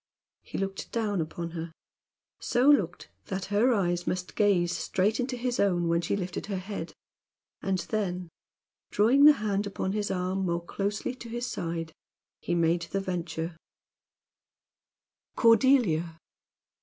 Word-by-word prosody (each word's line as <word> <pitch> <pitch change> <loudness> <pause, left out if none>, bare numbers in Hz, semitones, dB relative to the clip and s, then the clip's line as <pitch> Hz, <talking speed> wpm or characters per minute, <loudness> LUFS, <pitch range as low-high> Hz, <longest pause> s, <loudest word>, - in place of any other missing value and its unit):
He - - -7
looked 195 0 -4
down 210 -6 0
upon 165 +1 -5
her 165 0 -5 0.7
so 245 +3 +1
looked 200 - +3
that 190 -1 -3
her 230 +5 +4
eyes 175 -5 0
must 180 0 -2
gaze 180 -5 +3
straight 210 +5 0
into 250 0 -2
his 245 0 -2
own 175 -4 +2
when 170 0 +2
she 170 - -1
lifted 180 -1 -4
her 200 -2 -2
head, 185 -3 -6 0.7
and 195 -1 0
then, 180 -2 -2 0.6
drawing 250 +7 +5
the 300 - +10
hand 205 -4 -1
upon 190 -1 -2
his 205 0 -1
arm 185 +1 -1
more 170 0 -1
closely 205 +7 -2
to 240 -2 -10
his 240 +1 -3
side, 165 -8 -4 0.5
he 175 - -2
made 170 0 +2
the 195 - -1
venture: 170 -3 -3 1.8
"Cordelia!" 225 - +4
195 Hz, 140 wpm, -28 LUFS, 175-215 Hz, 1.8 s, the